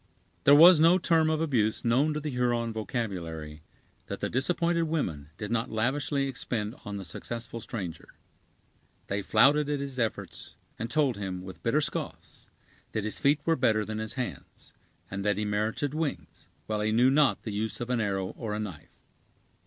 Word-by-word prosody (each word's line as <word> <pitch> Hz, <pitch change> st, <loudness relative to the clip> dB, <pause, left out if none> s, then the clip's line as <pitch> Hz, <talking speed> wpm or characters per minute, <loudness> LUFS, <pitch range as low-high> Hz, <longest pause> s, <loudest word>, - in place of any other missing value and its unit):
There 140 Hz, -, +8 dB
was 165 Hz, +2 st, +9 dB
no 165 Hz, +3 st, +6 dB
term 165 Hz, -3 st, +3 dB
of 155 Hz, 0 st, 0 dB
abuse 120 Hz, -10 st, +1 dB
known 140 Hz, +6 st, +3 dB
to -, -, -1 dB
the 150 Hz, 0 st, -4 dB
Huron 120 Hz, -2 st, 0 dB
vocabulary 85 Hz, -, -4 dB, 0.5 s
that -, -, -5 dB
the -, -, -2 dB
disappointed 170 Hz, +5 st, +1 dB
women 90 Hz, -, -2 dB
did 105 Hz, 0 st, -5 dB
not 115 Hz, -1 st, 0 dB
lavishly 135 Hz, +5 st, 0 dB
expend 115 Hz, -4 st, -3 dB
on 105 Hz, -1 st, -5 dB
the 95 Hz, -, -6 dB
successful 115 Hz, +7 st, -6 dB
stranger. 100 Hz, -, -6 dB, 0.9 s
They 100 Hz, +1 st, -1 dB
flouted 140 Hz, +9 st, +4 dB
at 145 Hz, -1 st, 0 dB
his 135 Hz, -2 st, -5 dB
efforts, 115 Hz, -3 st, -3 dB, 0.2 s
and 115 Hz, +1 st, -3 dB
told 140 Hz, -5 st, +2 dB
him, 95 Hz, -3 st, -4 dB
with 95 Hz, -1 st, -10 dB
bitter -, -, +2 dB
scoffs, -, -, -4 dB, 0.4 s
that 110 Hz, -, -1 dB
his 110 Hz, -, -2 dB
feet 145 Hz, +1 st, +3 dB
were 165 Hz, -, +3 dB
better 110 Hz, -6 st, +2 dB
than 110 Hz, 0 st, -4 dB
his 110 Hz, -1 st, -4 dB
hands; 125 Hz, -3 st, -6 dB, 0.4 s
and 95 Hz, +1 st, -3 dB
that 105 Hz, -1 st, +1 dB
he 105 Hz, -, -1 dB
merited 110 Hz, +7 st, -1 dB
wings, 155 Hz, -2 st, -4 dB, 0.2 s
while 105 Hz, -1 st, -2 dB
he 110 Hz, +1 st, +1 dB
knew 125 Hz, +4 st, +4 dB
not 145 Hz, 0 st, +3 dB
the 110 Hz, -, -4 dB
use 110 Hz, +1 st, -3 dB
of 120 Hz, +1 st, -3 dB
an 120 Hz, -2 st, +1 dB
arrow 95 Hz, -3 st, -1 dB
or 110 Hz, -3 st, -5 dB
a -, -, -3 dB
knife. 95 Hz, -9 st, -7 dB
115 Hz, 180 wpm, -28 LUFS, 105-145 Hz, 0.9 s, was